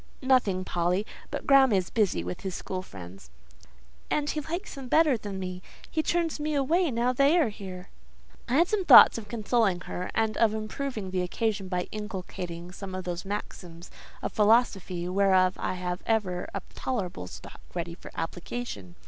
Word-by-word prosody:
"Nothing, 215 Hz, -8 st, +2 dB
Polly; 180 Hz, +4 st, 0 dB, 0.2 s
but -, -, -5 dB
Graham 275 Hz, -2 st, +6 dB
is 190 Hz, -3 st, +1 dB
busy 200 Hz, -, +1 dB
with 90 Hz, +1 st, -5 dB
his 190 Hz, -2 st, -4 dB
school 185 Hz, -1 st, -4 dB
friends." 90 Hz, -, -11 dB, 0.8 s
"And 295 Hz, -1 st, 0 dB
he 305 Hz, -, -2 dB
likes 345 Hz, +7 st, -5 dB
them 270 Hz, -3 st, -8 dB
better 310 Hz, 0 st, +4 dB
than 205 Hz, -3 st, -6 dB
me! 185 Hz, -1 st, -5 dB, 0.3 s
He 315 Hz, -, +1 dB
turns 335 Hz, -1 st, 0 dB
me 300 Hz, 0 st, -1 dB
away 320 Hz, +5 st, +2 dB
now 245 Hz, 0 st, +1 dB
they 280 Hz, +6 st, +4 dB
are 305 Hz, -9 st, +3 dB
here!" 185 Hz, -3 st, -9 dB, 0.6 s
I 250 Hz, -, +1 dB
had 340 Hz, +4 st, +5 dB
some 420 Hz, -2 st, 0 dB
thoughts 260 Hz, -6 st, +9 dB
of 210 Hz, -, -11 dB
consoling 215 Hz, -4 st, +1 dB
her, 180 Hz, 0 st, -5 dB
and 220 Hz, -1 st, +1 dB
of 220 Hz, -2 st, +3 dB
improving 215 Hz, -2 st, -4 dB
the 185 Hz, -1 st, 0 dB
occasion 200 Hz, +2 st, -1 dB
by 180 Hz, -1 st, -2 dB
inculcating 180 Hz, -4 st, -6 dB
some 190 Hz, 0 st, -7 dB
of 185 Hz, -, -4 dB
those 175 Hz, +1 st, -4 dB
maxims 180 Hz, -4 st, -6 dB, 0.3 s
of -, -, -3 dB
philosophy 205 Hz, -5 st, +2 dB
whereof 185 Hz, -1 st, +3 dB
I -, -, -1 dB
had 180 Hz, 0 st, -3 dB
ever 195 Hz, -6 st, 0 dB
a 200 Hz, -, -5 dB
tolerable 185 Hz, -, -3 dB
stock -, -, -11 dB
ready 170 Hz, -1 st, -3 dB
for 170 Hz, -, -11 dB
application. 165 Hz, -, -5 dB
200 Hz, 175 wpm, -28 LUFS, 180-250 Hz, 0.8 s, thoughts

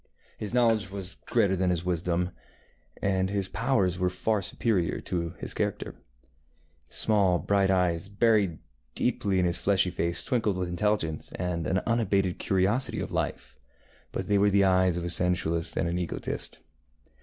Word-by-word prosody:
His 105 Hz, -, -3 dB
knowledge 115 Hz, -5 st, +2 dB
was 100 Hz, 0 st, -7 dB
greater 100 Hz, -5 st, +2 dB
than 95 Hz, 0 st, +1 dB
his 90 Hz, -1 st, -1 dB
wisdom, 90 Hz, 0 st, -1 dB, 0.7 s
and 95 Hz, -1 st, +1 dB
his 100 Hz, -2 st, -1 dB
powers 100 Hz, -6 st, 0 dB
were 90 Hz, 0 st, +2 dB
far 100 Hz, +4 st, 0 dB
superior 95 Hz, -2 st, -1 dB
to 85 Hz, -1 st, -3 dB
his -, -, -4 dB
character. -, -, -2 dB, 1.0 s
The -, -, -12 dB
small 100 Hz, -5 st, +4 dB
bright 100 Hz, +4 st, +1 dB
eyes, 90 Hz, -1 st, +1 dB
buried 100 Hz, -5 st, +2 dB, 0.4 s
deeply 100 Hz, -2 st, 0 dB
in 90 Hz, -, +3 dB
his 85 Hz, -1 st, +1 dB
fleshy 95 Hz, -2 st, +2 dB
face, 85 Hz, 0 st, -1 dB
twinkled 115 Hz, -7 st, 0 dB
with 90 Hz, -1 st, -2 dB
intelligence 90 Hz, -4 st, -1 dB
and 85 Hz, -3 st, -2 dB
an 95 Hz, -1 st, 0 dB
unabated 100 Hz, -6 st, +1 dB
curiosity 100 Hz, +7 st, +1 dB
of -, -, -4 dB
life, -, -, -3 dB, 0.6 s
but -, -, -4 dB
they 100 Hz, -1 st, +3 dB
were 100 Hz, +1 st, +4 dB
the 100 Hz, 0 st, +4 dB
eyes 95 Hz, -2 st, +3 dB
of 85 Hz, -, -3 dB
a 85 Hz, -, -3 dB
sensualist 85 Hz, -2 st, 0 dB
and 85 Hz, -, +1 dB
an 85 Hz, +1 st, -1 dB
egotist. 90 Hz, -, -4 dB
95 Hz, 160 wpm, -28 LUFS, 90-100 Hz, 1.0 s, small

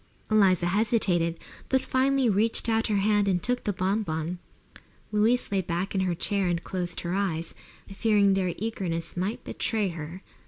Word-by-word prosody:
Eliza 190 Hz, -5 st, +4 dB
hesitated, 180 Hz, -4 st, +1 dB, 0.3 s
but 265 Hz, -, +3 dB
finally 265 Hz, 0 st, +2 dB
reached 220 Hz, +3 st, +1 dB
out 225 Hz, 0 st, +2 dB
her 215 Hz, -, 0 dB
hand 205 Hz, 0 st, +2 dB
and 180 Hz, -3 st, +1 dB
took 245 Hz, 0 st, 0 dB
the 205 Hz, -, +1 dB
bon 190 Hz, +3 st, 0 dB
bon. 160 Hz, -1 st, -3 dB, 0.7 s
Louise 220 Hz, +3 st, +2 dB
lay 195 Hz, -1 st, +2 dB
back 175 Hz, +2 st, -3 dB
in 190 Hz, -, +1 dB
her 180 Hz, -2 st, 0 dB
chair 195 Hz, +2 st, 0 dB
and 170 Hz, -1 st, -1 dB
closed 180 Hz, -2 st, -4 dB
her 175 Hz, 0 st, -3 dB
eyes, 175 Hz, -4 st, -1 dB, 0.3 s
fearing 200 Hz, -1 st, +2 dB
their 185 Hz, -2 st, 0 dB
eagerness 180 Hz, -6 st, -3 dB
might 190 Hz, +5 st, -2 dB
betray 215 Hz, -4 st, 0 dB
her. 165 Hz, +2 st, -7 dB
195 Hz, 165 wpm, -27 LUFS, 175-215 Hz, 0.7 s, Eliza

